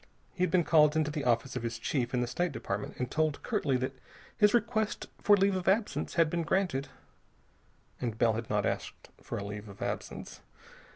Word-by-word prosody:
He 180 - -7
had 180 - +3
been 175 +1 +3
called 150 -2 +5
into 155 -1 +1
the 150 -2 -3
office 125 +2 +1
of 125 - -2
his 115 -1 -3
chief 120 +1 -1
in 125 - +1
the 125 - 0
State 175 +7 -1
Department 105 -6 -4
and 125 0 -3
told 155 -2 0
curtly 135 -3 +1
that 130 +1 -2 0.4
his 210 -2 +5
request 220 -2 0 0.2
for 205 0 +6
leave 195 0 +3
of 185 -1 -3
absence 205 +3 +1
had 165 -1 +5
been 170 +2 -1
granted. 165 -5 0 1.1
And 115 -3 -3
Bell 115 -1 +3
had 115 +1 -4
not 105 -1 +1
asked - - -4
for - - -5
a - - -4
leave 105 +1 -6
of 100 - -12
absence. - - -5
150 Hz, 205 wpm, -31 LUFS, 120-180 Hz, 1.1 s, for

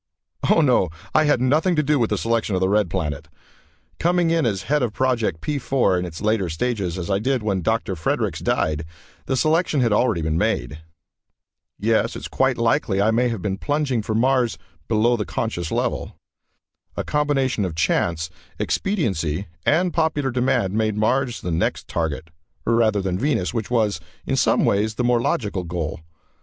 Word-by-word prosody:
Oh, 165 - +5
no, 125 - +3 0.2
I 155 - +4
had 145 -4 +3
nothing 155 +8 +2
to 150 - +2
do 150 0 +2
with 115 - +1
the - - 0
selection 115 -3 0
of - - +1
the 95 - +2
Red 105 -2 +2
Planet. 75 -5 -3 0.7
Coming 175 -1 +2
in 165 -6 +2
as 100 -4 -1
head 150 0 +1
of 120 -4 -1
Project 120 -11 0
P 150 -2 -2
4 125 -8 +1
in 90 - -3
its 85 +2 -8
latter 105 -4 +1
stages, 95 0 -2
as 90 +2 -4
I 95 - +2
did 130 +1 0
when 100 -3 0
Dr. 110 +1 0
Fredericks 80 - -1
died, 75 0 0 0.4
the 130 - 0
selection 155 +1 +2
had 115 -4 +2
already 105 -6 +2
been 80 +1 0
made. 75 +3 -1 1.0
Yes, 110 +1 +1
it's - - -6
quite 130 -1 +1
likely 115 -3 +1
I 105 +3 +3
may 120 +2 +2
have 115 -6 -4
been 95 -1 -2
plugging 145 -5 0
for 110 +1 -3
Mars 125 0 +2 0.3
below 115 +2 +3
the 110 - -2
conscious 90 -7 -3
level. - - -2 0.8
A - - -1
combination 140 -6 0
of 90 -4 -3
chance, 85 0 0 0.3
expediency 100 - -1 0.2
and 175 +3 +3
popular 155 -5 0
demand 120 -6 +1
made 110 -1 0
Mars 120 +3 +1
the 90 - -3
next 80 +1 -1
target, 80 -1 -3 0.3
rather 110 -3 +2
than 95 -1 -1
Venus, 130 -10 0
which 115 -4 -3
was, 110 -4 +1 0.3
in - - 0
some - - +3
ways, 105 +2 +1
the 125 - -1
more 120 -1 +3
logical 105 -6 -1
goal. 85 -3 -4
110 Hz, 180 wpm, -22 LUFS, 95-130 Hz, 1.0 s, Oh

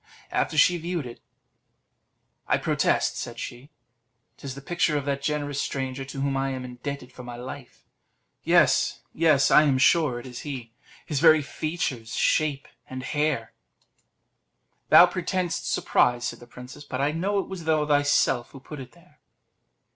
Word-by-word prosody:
After 155 - -1
she 180 - +6
had 175 - -4
viewed 170 -3 -3
it, 120 -1 -10 1.3
"I - - +3
protest," - - +1
said 120 0 -6
she, 125 +5 -8 0.7
"'tis 135 -2 -7
the - - -8
picture 155 0 0
of 140 - -3
that 140 -1 -2
generous 145 -1 -2
stranger 135 0 -3
to 135 0 -6
whom 140 0 0
I 135 0 0
am 130 -1 -5
indebted 125 +1 -7
for 125 - -10
my 120 -1 -8
life. 130 +2 -10 0.6
Yes, - - +3
yes, 155 -4 +3
I - - +8
am 140 -4 +2
sure 145 -2 +3
it 120 - -11
is 125 -1 -8
he; 125 -6 -7 0.3
his 150 -4 -2
very 155 -1 +6
features, 135 -6 -4
shape, 145 -3 +1 0.2
and 130 0 -6
hair." 145 -4 -1 1.4
"Thou 175 - +9
pretendest 180 0 -2
surprise," 120 0 +2
said - - -6
the 120 - -14
princess, 125 +4 -11
"but 130 -3 -5
I 140 +2 +1
know 190 +6 -1
it 195 - -1
was 185 -4 -7
thou 155 -1 +2
thyself 145 -4 +2
who 135 - -12
put 145 +2 -10
it 130 -2 -10
there." - - -23
140 Hz, 165 wpm, -25 LUFS, 130-155 Hz, 1.4 s, Thou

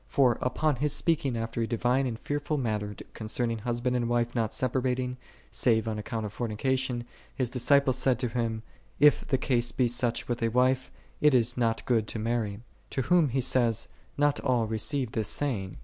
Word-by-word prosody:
For, 125 -4 +3
upon 145 +2 0
His 145 +2 0
speaking 145 -5 +1
after 115 +1 -3
a 115 - 0
divine 125 +3 +1
and 115 -3 -4
fearful 145 +4 -2
manner 105 -5 -2 0.2
concerning 115 +1 -2
husband 120 +2 -1
and 120 -1 0
wife 120 0 0
not 115 -3 0
separating, 125 0 -1 0.3
save 115 -3 +2
on 110 -1 -2
account 110 +1 -4
of 105 0 -7
forni 115 -3 -3
cation, 130 -1 0 0.3
His 125 -3 -1
disciples 130 +1 +3
said 130 -2 +3
to 125 0 -1
Him, 115 -1 -2 0.2
" - - -33
If - - -7
the 135 - +2
case 120 -2 +1
be 125 - +1
such 120 0 0
with 120 0 -2
a 115 - +2
wife, 130 +2 +2 0.3
it 150 -3 +5
is 125 0 +3
not 115 -2 0
good 115 -4 +1
to - - -4
marry."6 110 -2 -2 0.3
To 135 - +1
whom 170 0 +3
He 130 +2 0
saith, 120 -3 +2
" - - -33
Not 145 0 +2
all 125 -4 +1
re 110 0 -3
ceive 135 -1 -1
this 110 -3 -1
saying. 110 -11 -2
120 Hz, 200 wpm, -28 LUFS, 115-130 Hz, 0.3 s, it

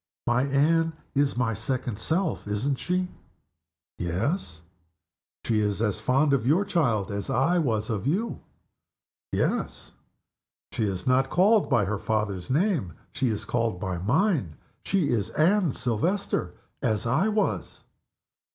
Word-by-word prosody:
"My 120 +1 +2
Anne 160 +4 +2 0.2
is 140 -2 +1
my 120 -2 +1
second 115 0 -3
self 165 - -1
isn't 125 +7 -1
she?" 180 0 -1 0.9
"Yes." 90 - -2 0.8
"She 110 -2 +2
is 105 -1 0
as 105 -4 0
fond 140 +3 +2
of 125 -3 +1
your 175 +8 +3
child 120 - +1
as 100 0 -4
I 165 +9 +2
was 115 -7 0
of 110 +3 -2
you?" 200 +10 -1 0.9
"Yes." - - -1 0.8
"She 110 - -1
is 95 -3 -3
not 130 +1 +3
called 205 +4 +4
by 105 -4 +3
her 105 +1 -2
father's 105 -5 -2
name 150 - +1 0.2
she 130 - 0
is 110 0 -2
called 115 -4 -1
by 95 -3 -3
mine. 130 - +1 0.3
She 180 -7 +1
is 110 -4 0
Anne 180 +1 +3
Silvester 120 - -1 0.3
as 110 0 0
I 135 - +2
was. 215 0 -1
125 Hz, 135 wpm, -26 LUFS, 105-165 Hz, 0.9 s, called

